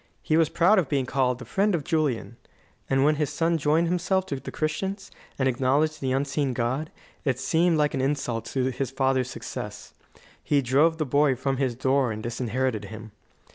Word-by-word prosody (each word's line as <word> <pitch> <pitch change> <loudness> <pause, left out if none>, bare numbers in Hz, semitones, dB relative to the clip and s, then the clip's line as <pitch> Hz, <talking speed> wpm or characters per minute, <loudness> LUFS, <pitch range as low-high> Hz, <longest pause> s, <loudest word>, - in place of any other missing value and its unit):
He 155 - +1
was 160 -1 +4
proud 185 +6 +4
of 165 - -1
being 135 -3 +1
called 125 -1 +1
"the 125 - -10
friend 200 0 +1
of 155 - -2
Julian"; 150 -9 -1 0.5
and 135 0 +3
when 150 +1 +3
his 150 -3 0
son 165 0 0
joined 155 +3 +2
himself 180 +2 0
to 140 -6 -4
the - - -8
Christians, 190 +6 -3 0.3
and 130 - +1
acknowledged 140 +5 +1
the 130 -1 -1
unseen 135 0 0
God, 130 +6 -1 0.3
it 135 -4 0
seemed 165 +5 +2
like 150 -1 +2
an 135 - -1
insult 130 -5 -1
to 130 +1 -1
his 130 0 -3
father's 130 -1 0
success. - - -7 0.5
He 145 -2 +2
drove 145 +6 +3
the 155 - -1
boy 140 0 +3
from 135 +2 -1
his 130 -3 0
door 130 0 +1
and 110 0 -5
disinherited 120 -1 -2
him. 110 +2 -9
135 Hz, 190 wpm, -26 LUFS, 130-155 Hz, 0.5 s, was